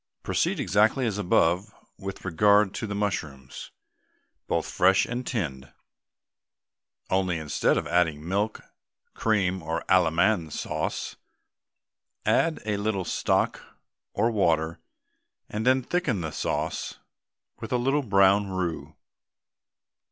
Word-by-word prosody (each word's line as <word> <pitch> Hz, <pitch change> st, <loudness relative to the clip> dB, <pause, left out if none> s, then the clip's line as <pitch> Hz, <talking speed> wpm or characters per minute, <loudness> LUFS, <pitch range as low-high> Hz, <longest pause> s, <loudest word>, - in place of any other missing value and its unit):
Proceed -, -, 0 dB
exactly 105 Hz, +8 st, +2 dB
as 105 Hz, -3 st, -1 dB
above 90 Hz, +1 st, +2 dB, 0.3 s
with 95 Hz, 0 st, -7 dB
regard 100 Hz, +3 st, +4 dB
to 115 Hz, -, -4 dB
the 100 Hz, -, -4 dB
mushrooms, 75 Hz, -10 st, -4 dB, 0.8 s
both -, -, -1 dB
fresh 95 Hz, +2 st, +3 dB
and 125 Hz, +1 st, -4 dB
tinned, 70 Hz, -, -3 dB, 1.4 s
only 95 Hz, -2 st, +1 dB
instead 80 Hz, -2 st, +1 dB
of -, -, -1 dB
adding 80 Hz, -3 st, 0 dB
milk, 100 Hz, +4 st, -1 dB, 0.5 s
cream, 95 Hz, -4 st, 0 dB
or 80 Hz, +1 st, -3 dB
Allemande 90 Hz, 0 st, +3 dB
sauce, 75 Hz, 0 st, -3 dB, 1.1 s
add 165 Hz, -1 st, +2 dB
a 105 Hz, -2 st, -1 dB
little 100 Hz, -2 st, -1 dB
stock -, -, 0 dB, 0.5 s
or 115 Hz, -, +1 dB
water, 85 Hz, -6 st, +1 dB, 0.7 s
and 110 Hz, +3 st, -2 dB
then 130 Hz, 0 st, +4 dB
thicken 145 Hz, -, -1 dB
the 80 Hz, -2 st, -4 dB
sauce -, -, -3 dB, 0.6 s
with 110 Hz, -, -7 dB
a 125 Hz, -, +2 dB
little 135 Hz, +4 st, +1 dB
brown 100 Hz, -3 st, +4 dB
roux. 90 Hz, -3 st, -3 dB
95 Hz, 115 wpm, -26 LUFS, 85-110 Hz, 1.4 s, regard